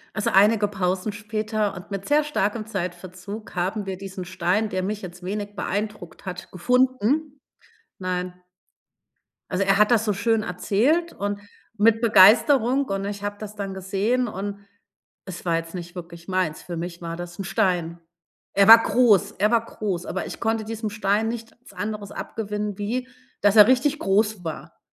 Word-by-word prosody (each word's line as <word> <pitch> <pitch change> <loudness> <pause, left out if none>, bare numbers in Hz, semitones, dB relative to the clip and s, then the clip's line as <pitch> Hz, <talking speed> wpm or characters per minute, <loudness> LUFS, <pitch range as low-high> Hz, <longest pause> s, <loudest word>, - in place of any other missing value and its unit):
Also 215 - 0
einige 205 +1 +4
Pausen 190 +1 -1
später 215 0 -2
und 180 +3 -11
mit 195 0 -5
sehr 300 +1 +4
starkem 220 -7 -1
Zeitverzug 185 +1 -6
haben 195 +4 -2
wir 190 -1 -4
diesen 190 -1 -7
Stein, 185 +4 0
der 185 - -2
mich 205 +3 -3
jetzt 180 -1 -9
wenig 205 +2 -5
beeindruckt 205 -4 -4
hat, 180 -1 -7
gefunden. 260 - +1 0.6
Nein. 180 -1 -3 1.2
Also, 185 +1 +1
er 195 0 +3
hat 210 +3 +4
das 225 -2 +3
so 210 - +1
schön 220 +3 +1
erzählt 255 - +1
und 205 0 -3 0.4
mit 225 +2 +4
Begeisterung, 235 +5 +5
und 195 -4 -3
ich 205 0 -5
habe 205 0 -3
das 215 -1 -8
dann 200 -2 -4
gesehen, 200 +7 0
und 200 0 -5 0.7
es 185 -2 -8
war 170 -1 +2
jetzt 165 +1 -6
nicht 175 0 -7
wirklich 170 -1 -9
meins. 185 -5 -1
Für 175 -2 -6
mich 170 +1 -6
war 165 0 -5
das 175 0 -8
'n - - -2
Stein. 175 -3 0 0.5
Er 200 0 +4
war 225 +1 +11
groß 210 -5 +4
er 210 +3 +3
war 230 -1 +2
groß, 190 -6 -4
aber 190 - -3
ich - - -8
konnte 225 -1 0
diesem 220 0 -4
Stein 210 +1 0
nichts 230 +1 -9
anderes 205 -1 -5
abgewinnen 210 -2 -4
wie, 240 +5 -2 0.3
dass 205 +1 +4
er 210 -1 +10
richtig 265 +4 +2
groß 205 0 +1
war. 160 - -7
205 Hz, 170 wpm, -24 LUFS, 185-220 Hz, 1.2 s, war